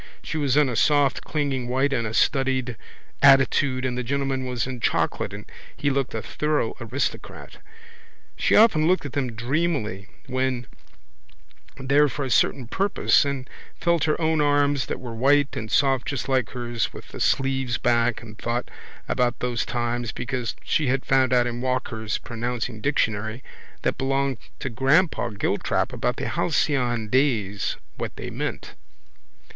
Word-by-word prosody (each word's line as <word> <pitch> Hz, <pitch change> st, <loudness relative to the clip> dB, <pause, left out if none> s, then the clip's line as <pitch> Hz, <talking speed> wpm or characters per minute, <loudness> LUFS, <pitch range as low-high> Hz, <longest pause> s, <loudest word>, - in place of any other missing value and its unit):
She -, -, -5 dB
was 140 Hz, -2 st, +1 dB
in 150 Hz, -2 st, +5 dB
a 125 Hz, -, -2 dB
soft 145 Hz, 0 st, +3 dB
clinging 140 Hz, -5 st, -2 dB
white 135 Hz, +3 st, +1 dB
in 115 Hz, -4 st, 0 dB
a 105 Hz, -, -5 dB
studied 130 Hz, -2 st, +1 dB, 0.5 s
attitude 135 Hz, -1 st, +4 dB
and 125 Hz, -1 st, -1 dB
the 125 Hz, -, -1 dB
gentleman 135 Hz, 0 st, -1 dB
was 125 Hz, -2 st, -1 dB
in 130 Hz, -1 st, -5 dB
chocolate -, -, 0 dB
and -, -, -8 dB, 0.3 s
he 145 Hz, -, +1 dB
looked 135 Hz, -3 st, -1 dB
a 110 Hz, -, -3 dB
thorough 150 Hz, -6 st, -1 dB
aristocrat. 120 Hz, +5 st, -4 dB, 0.8 s
She -, -, +2 dB
often 175 Hz, -9 st, +5 dB
looked 185 Hz, -3 st, +2 dB
at 140 Hz, -, -6 dB
them 130 Hz, -4 st, -1 dB
dreamily 120 Hz, -, -1 dB, 0.2 s
when 130 Hz, -2 st, -1 dB
she -, -, -22 dB, 1.1 s
went 135 Hz, -1 st, -8 dB
there 145 Hz, +1 st, +5 dB
for 135 Hz, +3 st, -3 dB
a 130 Hz, -, -4 dB
certain 130 Hz, +1 st, +2 dB
purpose 190 Hz, -, +2 dB
and 140 Hz, -2 st, -3 dB, 0.3 s
felt 170 Hz, -2 st, +2 dB
her 155 Hz, -, +1 dB
own 160 Hz, -1 st, +2 dB
arms 145 Hz, -2 st, +2 dB
that -, -, -4 dB
were 125 Hz, -3 st, -7 dB
white 140 Hz, +4 st, +3 dB
and 110 Hz, 0 st, -5 dB
soft 135 Hz, -2 st, +2 dB
just 135 Hz, -3 st, -3 dB
like 130 Hz, -4 st, +1 dB
hers 120 Hz, -2 st, -3 dB
with -, -, -11 dB
the -, -, -9 dB
sleeves 135 Hz, -3 st, +1 dB
back 120 Hz, -1 st, +1 dB
and 110 Hz, -1 st, -12 dB
thought 120 Hz, +1 st, -2 dB, 0.4 s
about 125 Hz, 0 st, +1 dB
those 125 Hz, -1 st, -2 dB
times 120 Hz, -1 st, -2 dB
because 125 Hz, -1 st, -3 dB
she 155 Hz, -4 st, +1 dB
had 135 Hz, +1 st, 0 dB
found 130 Hz, -2 st, +3 dB
out 125 Hz, -1 st, +4 dB
in 120 Hz, 0 st, -3 dB
Walker's 125 Hz, -4 st, -2 dB
pronouncing 120 Hz, -1 st, -4 dB
dictionary 110 Hz, -3 st, -1 dB, 0.4 s
that -, -, -1 dB
belonged 135 Hz, -1 st, 0 dB, 0.2 s
to 130 Hz, -, -2 dB
grandpapa 135 Hz, -, +2 dB
Giltrap 100 Hz, -, 0 dB
about -, -, -1 dB
the -, -, -4 dB
halcyon 120 Hz, -5 st, 0 dB
days 110 Hz, -6 st, +1 dB, 0.2 s
what -, -, -5 dB
they -, -, -6 dB
meant. -, -, -4 dB
130 Hz, 160 wpm, -24 LUFS, 120-140 Hz, 1.1 s, in